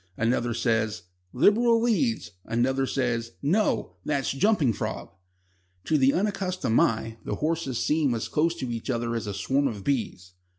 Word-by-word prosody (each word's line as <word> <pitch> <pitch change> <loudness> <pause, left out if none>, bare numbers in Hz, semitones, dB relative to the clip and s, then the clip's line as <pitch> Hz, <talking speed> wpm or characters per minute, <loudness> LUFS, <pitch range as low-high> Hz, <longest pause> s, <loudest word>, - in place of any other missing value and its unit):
Another 120 0 0
says: 115 -2 0 0.3
"Liberal 230 - +4
leads." 235 - 0
Another 130 +3 0
says: 115 -4 -1
"No; 155 - +1
that's 140 -3 -1
Jumping 145 - +2
Frog." - - -5 0.7
To 160 - 0
the 135 -2 +4
unaccustomed 185 - 0
eye 115 0 0
the - - -3
horses 155 -5 -1
seem 150 -2 +1
as 115 - -3
close 165 +2 +1
to 130 -7 -4
each 115 +3 -5
other 120 -1 -1
as 115 -2 -3
a 100 - -3
swarm 135 +8 +1
of 105 -6 -5
bees. 110 -9 -2
130 Hz, 155 wpm, -26 LUFS, 115-165 Hz, 0.7 s, Liberal